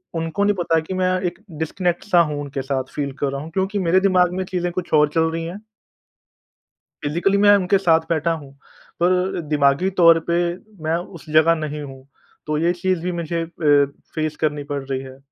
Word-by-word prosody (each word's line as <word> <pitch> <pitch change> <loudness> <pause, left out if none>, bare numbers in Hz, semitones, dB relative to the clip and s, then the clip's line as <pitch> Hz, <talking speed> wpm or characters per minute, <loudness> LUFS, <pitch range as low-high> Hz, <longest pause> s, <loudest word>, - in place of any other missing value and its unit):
उनको 165 +4 -1
नहीं 205 0 +2
पता 170 -3 +1
कि 160 +4 -6
मैं 185 0 +1
एक - - -23 0.2
डिस्कनेक्ट-सा 175 +3 0
हूँ 150 -3 -1
उनके 140 -1 -4
साथ, 135 0 -2
फ़ील 140 -1 -2
कर 140 -1 0
रहा 140 0 -4
हूँ 155 - -8
क्योंकि 195 +3 -1
मेरे 185 0 +3
दिमाग 185 -2 +3
में 185 +1 -2
चीज़ें 180 -1 -2
कुछ 180 0 -5
और 150 -1 +5
चल 160 -1 +2
रही 165 0 -3
हैं। 185 +6 -7 1.4
फ़िज़िकली 170 +7 +1
मैं 205 0 +6
उनके 195 0 +2
साथ 165 -4 +4
बैठा 165 0 +1
हूँ 145 -4 -7 0.5
पर 180 +1 +1
दिमागी 145 +4 +2
तौर 165 -1 +7
पे 170 - +2 0.5
मैं 160 +1 +1
उस 175 -2 -9
जगह 155 +2 +5
नहीं 150 -2 -4
हूँ। 135 -2 -10 0.4
तो 155 0 -1
ये 170 +3 +2
चीज़ 180 0 -1
भी 180 +1 -2
मुझे 170 -1 -2
अ, - - -4 0.7
फेस 155 -1 -2
करनी 150 -2 0
पड़ 145 -1 -4
रही 135 -1 -3
है। 130 0 -11
165 Hz, 195 wpm, -21 LUFS, 150-180 Hz, 1.4 s, तौर